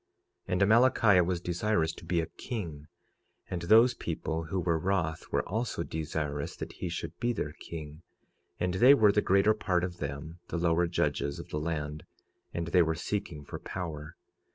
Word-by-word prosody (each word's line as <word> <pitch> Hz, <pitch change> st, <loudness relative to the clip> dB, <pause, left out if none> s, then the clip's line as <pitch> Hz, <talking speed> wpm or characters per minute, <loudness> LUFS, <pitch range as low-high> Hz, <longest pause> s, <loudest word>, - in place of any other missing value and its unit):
46:4 -, -, -2 dB
And 90 Hz, -, +1 dB
Amalickiah 110 Hz, -3 st, +5 dB
was 90 Hz, -2 st, 0 dB
desirous 85 Hz, -1 st, 0 dB
to -, -, -12 dB
be 85 Hz, 0 st, +1 dB
a -, -, -2 dB
king; 80 Hz, -9 st, -6 dB, 0.6 s
and 90 Hz, -2 st, -2 dB
those 115 Hz, +8 st, +6 dB
people 80 Hz, -3 st, -3 dB
who 90 Hz, +4 st, -2 dB
were 85 Hz, -2 st, +1 dB
wroth 80 Hz, -3 st, -1 dB
were -, -, 0 dB
also 110 Hz, -3 st, -2 dB
desirous 75 Hz, -3 st, -3 dB
that -, -, -7 dB
he 90 Hz, -, -4 dB
should 85 Hz, -1 st, -5 dB
be 120 Hz, 0 st, +1 dB
their 75 Hz, -9 st, -3 dB
king; 75 Hz, -1 st, -8 dB, 0.6 s
and 90 Hz, 0 st, 0 dB
they 125 Hz, +9 st, +7 dB
were 105 Hz, -5 st, +5 dB
the 105 Hz, -, +2 dB
greater 100 Hz, +3 st, +4 dB
part 90 Hz, -5 st, 0 dB
of 90 Hz, -1 st, -3 dB
them 75 Hz, +4 st, -6 dB
the -, -, -3 dB
lower 85 Hz, 0 st, +2 dB
judges 70 Hz, -4 st, -1 dB
of -, -, -9 dB
the 75 Hz, -, -2 dB
land, 75 Hz, -1 st, -3 dB, 0.5 s
and 85 Hz, -1 st, -3 dB
they 90 Hz, +1 st, +5 dB
were 80 Hz, -1 st, +1 dB
seeking 85 Hz, -4 st, -4 dB
for -, -, -7 dB
power. 75 Hz, -4 st, -6 dB
85 Hz, 180 wpm, -30 LUFS, 80-100 Hz, 0.6 s, they